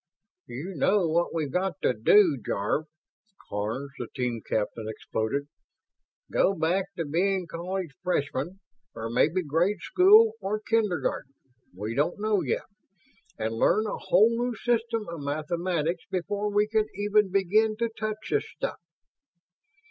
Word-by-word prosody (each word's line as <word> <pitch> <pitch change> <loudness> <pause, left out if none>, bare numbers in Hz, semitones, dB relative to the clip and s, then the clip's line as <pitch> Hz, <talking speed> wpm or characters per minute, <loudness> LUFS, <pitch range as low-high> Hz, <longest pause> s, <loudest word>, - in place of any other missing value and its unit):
"You 160 +11 -6
know 190 +4 +3
what 170 +2 +1
we've 155 -4 -2
got 180 -3 -1
to - - +3
do 160 - +5
Jarve?" 105 +12 -1 0.6
Karns, 110 +7 -3
the 120 - -4
team 125 -4 -2
captain, 110 +1 -2
exploded. 110 +5 -3 0.8
"Go 195 - +3
back 180 +3 +1
to 165 - -2
being 185 +5 +1
college 170 -1 -4
freshmen 170 +1 -2 0.3
or 115 0 -4
maybe 165 +9 +2
grade 170 +7 +1
school 420 - +6
or 210 +2 -1
kindergarten, 210 -10 -1 0.4
we 105 +5 -5
don't 150 - 0
know 210 -1 +1
yet - - -2 0.7
and 110 0 -2
learn 200 - +3
a 210 - -3
whole 210 +6 +4
new 240 +1 -1
system 230 0 -1
of 170 -3 -6
mathematics 165 +3 -2
before 200 +3 -2
we 205 +1 +3
can 215 0 +1
even 205 0 +2
begin 210 +3 +2
to 235 +1 +1
touch 215 -1 -5
this 430 - 0
stuff!" - - -3
180 Hz, 140 wpm, -27 LUFS, 145-210 Hz, 0.8 s, school